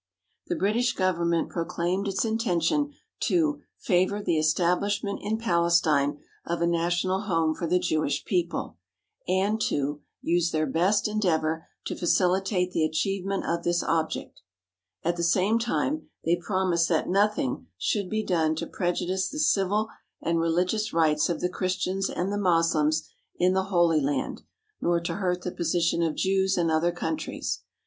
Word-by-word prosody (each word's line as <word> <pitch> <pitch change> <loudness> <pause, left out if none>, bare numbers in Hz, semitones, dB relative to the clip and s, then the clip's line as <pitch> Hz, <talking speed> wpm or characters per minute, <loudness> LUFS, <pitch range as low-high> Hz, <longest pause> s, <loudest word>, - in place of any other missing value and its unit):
The 350 - -1
British 235 0 +1
Government 170 -3 +1
proclaimed 175 +3 -1
its 195 +3 0
intention 225 - 0 0.2
to 305 -4 +1 0.2
"favour 185 +1 +1
the 170 -6 0
establishment 180 +6 +1
in 215 +2 -1
Palestine 170 -8 +2 0.3
of 170 0 -2
a 170 - +2
national 175 +3 +1
home 165 -5 +1
for 170 - -4
the 180 +2 +3
Jewish 155 -4 0
people" 175 -3 -2 0.5
and 195 +4 +1
to 145 +1 -1 0.2
"use 170 0 +1
their 155 -1 0
best 180 +10 +2
en 215 0 -2
deavour 160 -4 0 0.2
to - - -3
facilitate 180 +1 +1
the 165 - +1
achievement 195 +5 -1
of 170 0 -1
this 175 0 +1
object." 160 -1 -2 0.6
At 170 +1 0
the 170 - -1
same 190 +6 +3
time 275 +6 -1 0.2
they 170 +2 +3
promised 175 -2 0
that 165 -3 +1
nothing 200 -8 +1
should 200 - -1
be 215 0 -1
done 160 -3 +1
to 170 - -3
prejudice 180 +2 -1
the 300 - -7
civil 210 -7 +2 0.3
and 165 0 0
religious 180 +6 0
rights 155 -2 +3
of 170 - -2
the 180 - +2
Christians 185 +1 -1
and 190 +3 -2
the 205 - -1
Moslems 165 -4 +2 0.3
in 180 +1 +2
the 190 0 +1
Holy 175 -5 +3
Land, 140 -1 -2 0.4
nor 170 0 +2
to 170 - -3
hurt 180 -2 -1
the 180 - -3
position 170 0 0
of 165 -2 0
Jews 190 0 +1
in 170 -2 +2
other 160 +2 +2
countries. 235 - -3
175 Hz, 155 wpm, -26 LUFS, 165-195 Hz, 0.6 s, the